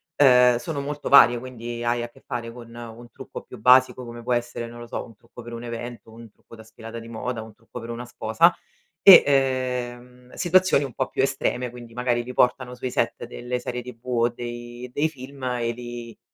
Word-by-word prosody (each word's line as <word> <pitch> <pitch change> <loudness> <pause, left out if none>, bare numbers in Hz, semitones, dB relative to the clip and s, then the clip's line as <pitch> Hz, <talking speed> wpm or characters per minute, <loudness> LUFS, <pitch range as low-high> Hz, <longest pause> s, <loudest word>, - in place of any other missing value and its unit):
ehm, 125 -3 +6
sono 145 +4 -4
molto 145 +1 -5
varie, 120 -3 +8
quindi 120 -1 -6
hai 120 0 +1
a 120 - -5
che - - -21
fare 120 -3 -4
con 115 -1 -12
un 120 0 -10
trucco 135 - -9
più 125 - -12
basico, 130 +2 +5
come 120 0 -9
può 125 - 0
essere, 120 0 -2
non 120 0 -11
lo 120 - -9
so, - - -4
un 115 - -16
trucco 115 +2 -14
per 120 0 -9
un 115 +1 -7
evento, 120 -1 -7
un 115 -1 -13
trucco 115 - -17
da 110 - -13
sfilata 115 +1 -10
di 115 - -11
moda, 115 0 -4
un 110 -1 -13
trucco 115 +3 -11
per 115 0 -9
una 120 +1 -6
sposa 120 +8 +3 0.5
e, 195 -3 +11
ehm, 125 -2 -1
situazioni 185 -4 +3
un 135 - -6
po' 130 - -2
più - - -1
estreme, 130 -2 -1
quindi 120 -1 -12
magari 120 -1 0
ti 125 +1 -8
portano 125 0 +2
sui 125 +1 -4
set - - -1
delle 125 0 -4
serie 125 0 -4
TV 120 -1 -12
o 120 -2 +2
dei 120 +1 -8
dei 150 +4 +1
film 135 -2 -11
e 120 -2 -1
lì, 120 -1 -8
120 Hz, 215 wpm, -24 LUFS, 120-125 Hz, 0.5 s, e